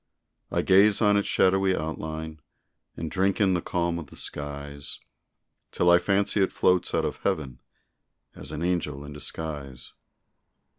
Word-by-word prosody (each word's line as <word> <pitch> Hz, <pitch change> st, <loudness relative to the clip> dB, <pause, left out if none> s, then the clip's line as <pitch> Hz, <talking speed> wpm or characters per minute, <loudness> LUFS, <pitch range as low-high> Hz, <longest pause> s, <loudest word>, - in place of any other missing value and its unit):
I -, -, 0 dB
gaze 100 Hz, +2 st, +5 dB
on 105 Hz, -2 st, +4 dB
its 100 Hz, -, +1 dB
shadowy 95 Hz, 0 st, +3 dB
outline 80 Hz, 0 st, -5 dB, 0.6 s
And 80 Hz, -2 st, -4 dB
drink 95 Hz, +2 st, +1 dB
in 100 Hz, -3 st, +3 dB
the 90 Hz, -, 0 dB
calm 85 Hz, -1 st, -1 dB
of 80 Hz, -, -8 dB
the -, -, -15 dB
skies, 70 Hz, -1 st, -6 dB, 0.7 s
Till 90 Hz, -, +3 dB
I 85 Hz, -, +7 dB
fancy 100 Hz, +2 st, +1 dB
it 95 Hz, -, +2 dB
floats 90 Hz, -1 st, +2 dB
out -, -, +1 dB
of -, -, -3 dB
heaven, 65 Hz, -5 st, -3 dB, 0.7 s
As 70 Hz, -, -8 dB
an 75 Hz, +2 st, -4 dB
angel 75 Hz, -6 st, -2 dB
in 75 Hz, -, -9 dB
disguise. 75 Hz, -4 st, -5 dB
85 Hz, 150 wpm, -26 LUFS, 75-95 Hz, 0.7 s, I